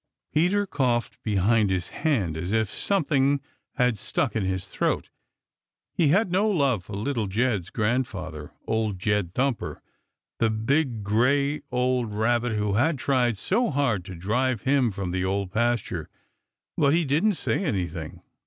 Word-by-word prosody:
Peter 180 +6 +2
coughed 125 - -1
behind 105 +1 +2
his 90 -2 -1
hand 110 - 0
as 90 +4 -4
if 110 -2 +1
something 145 -7 +1 0.4
had 125 -4 +2
stuck - - -1
in 110 - 0
his 95 0 -2
throat. - - -1 0.8
He 165 - +2
had 185 +5 +3
no 200 +4 +2
love 140 - +1
for 105 - -9
Little 110 +1 -1
Jed's 105 -3 0
grandfather, 105 - -2
Old 110 -3 -1
Jed 100 -2 -1
Thumper, 130 -2 -1 0.6
the 115 - +3
big, 115 +1 0
gray, 140 +8 +2
old 125 -3 0
Rabbit 120 +2 +1
who 105 -1 0
had 145 +9 +2
tried 125 -4 +1
so 230 - +1
hard 130 - 0
to 95 - -8
drive 110 +6 0
him 135 -3 +3
from 95 -3 -4
the 90 0 -1
Old 95 0 -1
Pasture, 120 +1 -1 0.7
but 140 +1 +3
he 170 -1 +2
didn't 160 +10 +2
say 190 - -1
anything. 85 - -3
115 Hz, 150 wpm, -26 LUFS, 100-140 Hz, 0.8 s, had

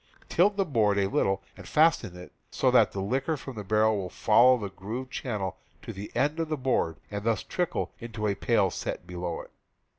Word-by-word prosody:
Tilt 200 +4 +3
the 195 - +2
board 110 - +2
a 100 -1 +2
little 95 0 0
and - - -11
fasten 150 - +3
it 90 - -11 0.2
so - - +1
that - - +5
the 100 - -5
liquor 130 +10 -1
from 135 -1 -8
the 105 - -5
barrel 110 +2 +3
will 95 -2 -4
follow 120 +7 +5
the 100 -4 -5
grooved 115 +8 -6
channel 105 -10 -3 0.3
to - - -6
the 100 +2 -8
end 150 +4 +1
of 165 -1 -1
the 155 - -1
board 125 - 0
and 100 0 -4
thus 115 0 0
trickle 180 -1 -2
into 115 -2 -5
a 100 - +2
pail 100 -2 +2
set - - -5
below 90 -1 -4
it. - - -15
110 Hz, 210 wpm, -28 LUFS, 95-135 Hz, 0.3 s, that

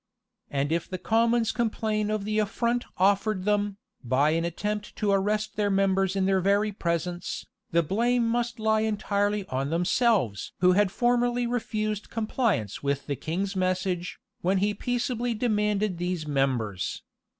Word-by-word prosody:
And 140 +1 -1
if 170 +1 -1
the 185 - -3
commons 230 +3 +2
complain 215 -2 -1
of 215 -2 -1
the 215 0 0
affront 235 +3 0
offered 195 0 +2
them, 205 -1 +1 0.3
by 130 +5 +2
an 165 +1 +1
attempt 210 +5 -3
to 210 -2 0
arrest 210 +2 0
their 205 -1 +2
members 195 -1 +2
in 190 -1 +1
their 190 -1 +2
very 200 +3 +2
presence, 175 -2 -3 0.2
the 170 0 +2
blame 235 +7 +1
must 240 +1 -1
lie 220 0 +2
entirely 205 -1 0
on 135 +2 -1
themselves! 175 - +1
who 180 +1 +5
had 195 0 +3
formerly 245 +1 +1
refused 215 -3 -2
compliance 220 - -1
with 140 0 -1
the 145 - -2
king's 190 +8 -3
message, 185 -1 -1 0.2
when 190 +2 +2
he 205 +2 +1
peaceably 245 +1 -1
demanded 210 -4 0
these 175 -3 -2
members. 125 -9 -1
205 Hz, 150 wpm, -27 LUFS, 180-220 Hz, 0.3 s, who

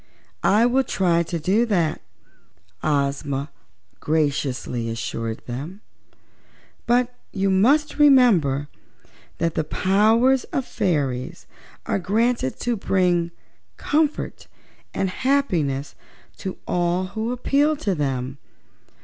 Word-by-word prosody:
"I 215 +4 +4
will 260 +2 +3
try 175 -7 +1
to 170 0 -3
do 190 +9 +2
that," 175 -7 0 0.8
Ozma 140 -1 -1 0.5
graciously 140 -6 -1
assured 115 0 -4
them, 145 - -6 1.1
"but 245 +1 +2 0.2
you 195 -1 0
must 280 +12 +3
remember 205 - +5 0.7
that 165 -1 0
the - - 0
powers 220 +10 +3
of 270 - -3
fairies 145 - -2 0.4
are - - 0
granted 215 - 0
them - - -29
to 240 -2 0
bring 180 -3 +1 0.5
comfort 305 0 -1 0.4
and 195 - -1
happiness 180 - 0 0.4
to 190 - -5
all 175 +1 0
who 220 +3 -2
appeal 285 +5 +2
to 205 -9 -1
them. 135 -3 -3
185 Hz, 105 wpm, -23 LUFS, 145-240 Hz, 1.1 s, remember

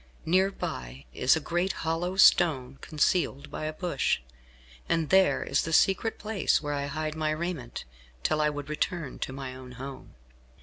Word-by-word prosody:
Near 185 +4 +3
by 65 - -6
is 125 - +4
a - - 0
great 175 +4 -1
hollow 170 +3 -1
stone, 140 -9 +4
concealed 150 -2 0
by - - -4
a 155 - -3
bush, 170 -4 0 0.7
and 165 -2 +1
there 190 0 +4
is - - +1
the 165 - -4
secret 195 +6 +3
place 210 -4 +1
where 145 -1 -3
I 140 0 -2
hide 155 +2 -3
my 155 -1 -1
raiment, 155 -5 -4 0.4
till 155 0 +1
I 150 - +3
would 145 -1 -5
return 155 -1 -3
to - - -3
my 135 -1 -6
own 130 -1 -10
home." 135 +2 -9
155 Hz, 170 wpm, -28 LUFS, 135-175 Hz, 0.7 s, is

